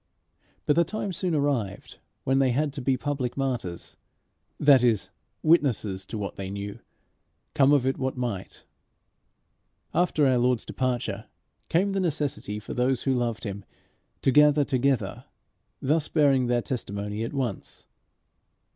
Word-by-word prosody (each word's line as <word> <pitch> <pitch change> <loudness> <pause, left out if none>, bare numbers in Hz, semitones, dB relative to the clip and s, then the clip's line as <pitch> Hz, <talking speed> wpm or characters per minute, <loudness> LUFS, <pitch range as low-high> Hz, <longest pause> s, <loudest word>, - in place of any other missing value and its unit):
But 150 - +3
the 170 - +5
time 195 +2 -4
soon 175 -1 -1
arrived 130 -9 -2 0.2
when 135 +1 +2
they 135 -1 +3
had 140 +3 0
to 140 - -5
be 130 +1 +1
public 135 -3 -3
martyrs 125 -11 -3 0.6
that 140 -4 +6
is, 115 -5 +2 0.3
witnesses 110 - +2
to - - -5
what 100 -1 -5
they 95 -1 -5
knew, 100 +1 -6 0.7
come 135 0 +4
of 140 -3 +4
it 135 - 0
what 130 0 -2
might. 115 -7 -4 1.3
After 165 -4 +2
our 130 -2 +3
Lord's 125 -1 +1
departure 120 -5 -2 0.4
came 190 +4 +2
the 195 - 0
necessity 145 - -2
for 105 - -7
those 125 +1 +1
who 135 - +2
loved 120 -1 -1
him 100 -2 -5 0.6
to 135 - +4
gather 150 +1 +5
together, 135 -1 0 0.6
thus 150 +3 +2
bearing 140 -5 +3
their 120 -1 +1
testimony 105 -3 -4
at 115 - -4
once. 125 -8 -4
130 Hz, 145 wpm, -26 LUFS, 115-145 Hz, 1.3 s, that